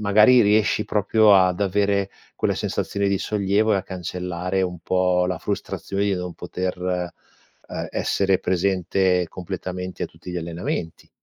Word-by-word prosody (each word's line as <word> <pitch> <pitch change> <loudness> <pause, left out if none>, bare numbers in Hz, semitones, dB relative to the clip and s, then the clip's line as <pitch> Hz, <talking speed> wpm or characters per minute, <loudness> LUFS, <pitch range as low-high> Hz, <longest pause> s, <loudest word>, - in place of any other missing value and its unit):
magari 105 +4 +6
riesci 105 0 +3
proprio 105 0 +4
ad 95 0 +3
avere 100 0 +1 0.3
quella - - 0
sensazione 100 0 -2
di 100 -1 +1
sollievo 105 +1 +1
e - - +3
a 95 - -1
cancellare 90 0 -3
un 90 -1 -3
po' 90 +1 +1
la 90 -1 -1
frustrazione 100 +4 -3
di 100 -1 +1
non 90 -1 -4
poter, 90 +2 -4
ehm, 90 -1 -1 0.8
essere 95 -1 +1
presente 90 0 +1
completamente 90 0 -6
a - - 0
tutti 90 - -11
gli 90 - -4
allenamenti. 85 0 -4
95 Hz, 145 wpm, -23 LUFS, 90-100 Hz, 0.8 s, magari